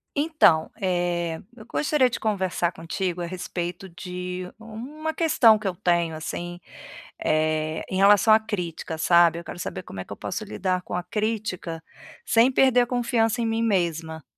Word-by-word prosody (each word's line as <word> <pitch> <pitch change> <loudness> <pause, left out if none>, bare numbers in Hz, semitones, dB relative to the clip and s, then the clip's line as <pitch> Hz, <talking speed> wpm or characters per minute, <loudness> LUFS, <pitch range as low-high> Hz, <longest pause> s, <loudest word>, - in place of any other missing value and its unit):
Então, 285 - +3
eh, 175 -3 -1 0.2
eu 220 -3 -13
gostaria 285 -1 +2
de - - -4
conversar 190 -5 0
contigo 175 +2 -3
à - - -2
respeito 175 +1 -5
de 180 +1 -6
um 225 +3 -8
uma 315 0 -2
questão 270 -10 +5
que 215 - -11
eu 190 - -1
tenho, 170 -2 +1
assim, 175 +2 -5 0.6
eh 155 0 0
em 185 - -2
relação 205 +2 +6
à 215 - +7
crítica, 180 -7 -4
sabe, 170 0 +4
eu 170 - -9
quero 175 - -8
saber 95 - -5
como 95 - -9
é 95 - -5
que - - -16
eu - - -12
posso 210 +4 -4
lidar 185 -3 -2
com - - -8
a 180 - -2
crítica, 205 -5 -3 0.4
sem 240 +2 +4
perder 255 -1 +4
a 245 - 0
confiança 240 -1 +1
em - - 0
mim 225 0 0
mesma. 165 -6 -1
180 Hz, 175 wpm, -25 LUFS, 170-225 Hz, 0.6 s, à